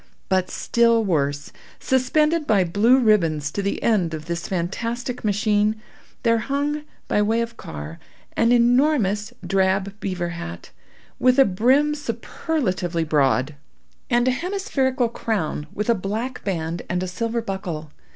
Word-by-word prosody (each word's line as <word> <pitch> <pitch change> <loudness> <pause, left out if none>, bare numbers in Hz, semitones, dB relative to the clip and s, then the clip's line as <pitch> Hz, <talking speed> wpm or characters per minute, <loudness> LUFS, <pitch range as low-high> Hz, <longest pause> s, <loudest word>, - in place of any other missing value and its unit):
But 185 -1 +1
still 230 -1 +2
worse. 145 -6 -1 0.3
Suspended 300 +5 +1
by 200 -4 +4
blue 205 +9 +4
ribbons 165 - +2
to 200 - -2
the 200 0 -2
end 185 -8 +2
of 155 0 -8
this 170 0 -4
fantastic 230 +8 -3
machine, 210 0 +2 0.5
there 230 -1 +3
hung, 290 +4 -2 0.2
by 210 - +2
way 220 +2 +2
of 230 0 -4
car, 75 - -8 0.4
an 230 - +3
enormous 240 -4 +3
drab 190 +1 +1
beaver 185 -4 -3
hat, 85 - -7 0.5
with 255 +1 +4
a 270 - +7
brim 260 +10 +3
superlatively 230 - -2
broad, 145 -2 +2 0.6
and 240 0 +2
a - - +4
hemispherical 270 - 0
crown 200 -10 -3
with 210 - -3
a 235 - +5
black 220 +5 -4
band 170 -3 -2
and 180 +1 -1
a - - -3
silver 230 +6 -2
buckle. 175 -7 -5
210 Hz, 140 wpm, -23 LUFS, 175-245 Hz, 0.6 s, a